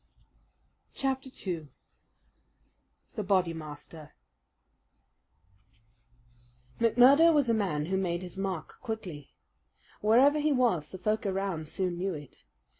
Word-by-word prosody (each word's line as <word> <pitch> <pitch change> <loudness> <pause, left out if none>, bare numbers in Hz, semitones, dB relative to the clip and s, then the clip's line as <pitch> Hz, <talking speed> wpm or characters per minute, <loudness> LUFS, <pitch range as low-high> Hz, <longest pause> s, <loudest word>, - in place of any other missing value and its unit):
Chapter 265 -1 -1
2 170 - -6 1.4
The 215 - -3
Bodymaster 160 -5 -3 2.7
McMurdo 255 +8 +6
was 285 -6 +3
a - - +3
man 180 -9 0
who 190 +3 -1
made 175 -2 -2
his 180 0 -8
mark 190 -4 -5
quickly. 200 - -7 0.7
Wherever 260 +8 +5
he 300 +1 +1
was 230 - +1
the 185 - -8
folk 215 +2 -1
around 190 -5 -2
soon 180 +1 -2
knew 190 -1 -2
it. 145 - -11
195 Hz, 105 wpm, -29 LUFS, 165-235 Hz, 2.7 s, McMurdo